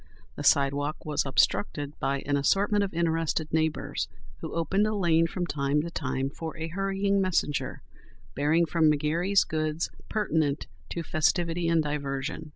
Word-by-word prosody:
The - - -5
sidewalk 145 +2 +2
was 150 -2 0
obstructed 115 +7 +1
by 135 +1 0
an 145 0 +1
assortment 200 +8 +2
of 195 - -2
interested 165 -2 0
neighbours, 160 -1 0 0.3
who - - -6
opened 190 +6 +1
a 215 - -1
lane 165 -4 +3
from 175 +1 -3
time 145 -2 0
to 170 - -5
time 135 -3 -2
for 160 +2 -6
a 160 +1 -4
hurrying 195 +2 0
messenger 145 -8 -1 0.5
bearing 155 +5 +2
from 160 -1 +3
McGary's 165 +7 +2
goods 155 +1 -2 0.2
pertinent 160 -9 0 0.2
to 170 - -3
festivity 170 +2 +1
and 165 -1 +3
diversion. 145 +1 -3
160 Hz, 150 wpm, -28 LUFS, 145-170 Hz, 0.5 s, lane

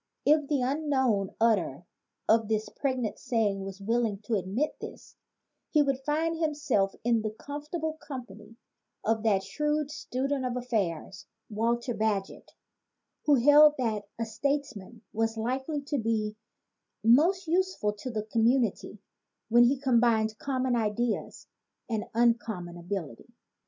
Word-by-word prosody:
If 300 -1 +4
the 280 -4 +1
unknown 265 -8 0
utterer 190 -9 +1 0.4
of 225 -1 +4
this 215 0 -1
pregnant 255 -5 -2
saying 220 -6 0
was 195 0 -7
willing 225 0 0
to 230 - -3
admit 205 - -1
this, - - -10 0.5
he 300 -2 +4
would 275 -2 0
find 310 +4 0
himself 295 -11 0
in 230 -1 +2
the 215 - -2
comfortable 300 +7 -5
company 225 -6 -9 0.5
of 220 0 +1
that 205 -3 +2
shrewd 300 +8 -1
student 275 -2 -2
of 250 -1 -2
affairs, 195 -5 -3 0.2
Walter 235 +3 0
Bagehot, 215 -3 -2 0.8
who 295 - +6
held 295 +4 +7
that 215 -5 -1
a 230 - -2
statesman 235 -3 -3
was 225 +1 0
likely 265 +6 -2
to 285 0 -2
be 215 -2 -1 0.7
most 330 - +4
useful 350 - 0
to 210 +5 -7
the 215 -3 -3
community 230 -1 +1 0.5
when 240 +1 +6
he 270 +3 +3
combined 230 -4 +2
common 260 -2 0
ideas 225 0 -1 0.4
and 220 -3 -2
uncommon 225 -7 +1
ability. 175 - -6
235 Hz, 130 wpm, -28 LUFS, 215-280 Hz, 0.8 s, held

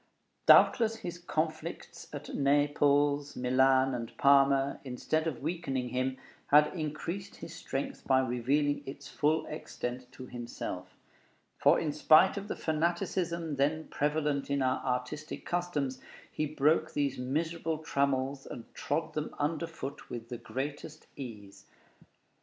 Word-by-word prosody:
Doubtless 225 -2 +6
his 175 -6 -6
conflicts 155 -2 -4
at - - -7
Milan, - - -2
Naples, 145 0 +3
and 130 -1 +2
Parma, 140 0 +4
instead 150 +5 -1
of 135 -5 -4
weakening 140 -6 -2
him, 130 +1 -1 0.3
had 150 +1 +5
increased 170 +4 -4
his 165 0 -9
strength 140 -4 -5
by 130 - +5
revealing 135 +4 +1
its 135 +1 -8
full 155 +2 +1
extent 125 -4 -6
to 130 - -9
himself; 120 -7 -6 0.6
for - - +5
in 155 - -1
spite 155 +5 +6
of 200 0 -5
the - - -3
fanaticism 170 0 -1
then 155 +3 0
prevalent 150 -1 0
in 140 -1 +1
our 130 0 0
artistic 125 +4 -3
customs, 150 -7 -2 0.3
he 155 - -1
broke 155 +2 +2
these 140 -3 0
miserable 160 +5 -1
trammels 140 -2 -1
and 115 - -9
trod 155 +3 -2
them 150 0 -2
underfoot 155 -1 -3
with 115 -1 -6
the 120 - -4
greatest 145 +5 -5
ease. 105 -7 -9
145 Hz, 130 wpm, -31 LUFS, 130-155 Hz, 0.6 s, Doubtless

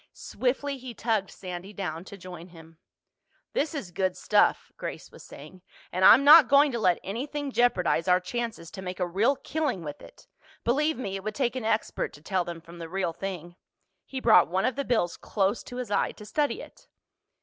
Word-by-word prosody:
Swiftly 270 +2 -2
he 250 -2 -8
tugged 220 -4 0
Sandy 185 +2 -8
down 175 -5 -4
to 200 - -10
join 180 -2 -10
him. 165 -2 -16 0.7
"This 315 +2 -1
is 210 -11 -5
good 185 +1 -1
stuff," - - +2
Grace - - -7
was - - -14
saying. 155 +6 -13 0.3
"And 185 +1 -1
I'm 235 +8 +9
not 300 -1 +9
going 280 +2 +5
to 235 - -2
let 180 -5 +3
anything 275 +7 -4
jeopardize 190 -9 +2
our 180 0 +5
chances 220 -3 -5
to 190 - -8
make 180 0 -6
a 180 - +1
real 205 +10 +2
killing 285 - -2
with 145 -2 -7
it. - - -15 0.4
Believe 300 +6 +1
me, 200 -6 -4
it 195 - -9
would 215 0 -4
take 255 -3 0
an 255 -4 -4
expert 220 0 -1
to 145 - -14
tell 185 +1 0
them 170 -1 -7
from 170 +1 -13
the 165 -1 -7
real 185 -2 -2
thing." 175 -2 -6 0.5
He 265 - -6
brought 220 -8 +6
one 185 +4 0
of 255 - 0
the 280 - -2
bills 220 -8 0
close 200 +1 -1
to 245 - -9
his 250 -4 -5
eye 200 - +1
to 210 - -12
study 295 - -1
it. - - -16
200 Hz, 205 wpm, -27 LUFS, 180-255 Hz, 0.7 s, I'm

